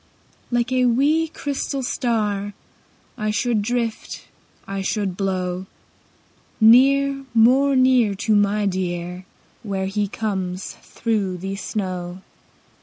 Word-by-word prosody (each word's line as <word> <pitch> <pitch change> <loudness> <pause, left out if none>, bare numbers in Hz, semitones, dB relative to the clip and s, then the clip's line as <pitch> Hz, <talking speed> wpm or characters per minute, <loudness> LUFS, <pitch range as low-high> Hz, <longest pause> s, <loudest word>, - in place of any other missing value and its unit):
Like 240 +1 0
a 255 -1 +3
wee, 290 +7 +2
crystal 280 -2 -3
star 210 -5 -1 0.6
I 215 0 -1
should 220 0 +1
drift, 230 0 -3 0.4
I 195 0 -3
should 195 -1 -2
blow 185 -1 -2 0.9
Near, 275 +4 +5
more 265 +5 +5
near, 255 -5 +4
To 210 +2 +1
my 205 0 +2
dear 180 -1 -3 0.4
Where 195 -4 -3
he 205 +1 -1
comes 190 -3 -3
through 205 -5 -2
the 195 +2 -4
snow. 185 -3 -4
210 Hz, 110 wpm, -22 LUFS, 190-245 Hz, 0.9 s, Near